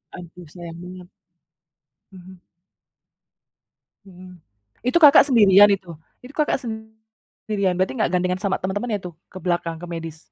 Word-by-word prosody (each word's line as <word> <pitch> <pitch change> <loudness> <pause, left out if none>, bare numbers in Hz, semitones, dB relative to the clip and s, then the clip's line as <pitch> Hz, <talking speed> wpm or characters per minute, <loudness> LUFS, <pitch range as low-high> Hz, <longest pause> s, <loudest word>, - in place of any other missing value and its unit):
Aduh 175 0 -12
sayang 170 -2 -10
banget. 180 0 -11 1.0
Mhm. 185 -1 -14 1.7
Mhm. 180 -1 -15 0.5
Itu 255 - +2
Kakak 285 0 +8
sendirian 205 -5 +6
itu? 185 -3 -13 0.3
Itu 255 - -12
Kakak 300 -1 0
sendirian 220 -3 -6
berarti 185 +1 -1
nggak 215 - +1
gandengan 180 0 0
sama 195 -2 -1
temen-temennya 205 +3 -3
tuh? 175 -2 -8
Ke 185 - -11
belakang, 175 -2 -2
ke - - -7
medis? 165 -1 -8
185 Hz, 130 wpm, -21 LUFS, 175-215 Hz, 1.7 s, Kakak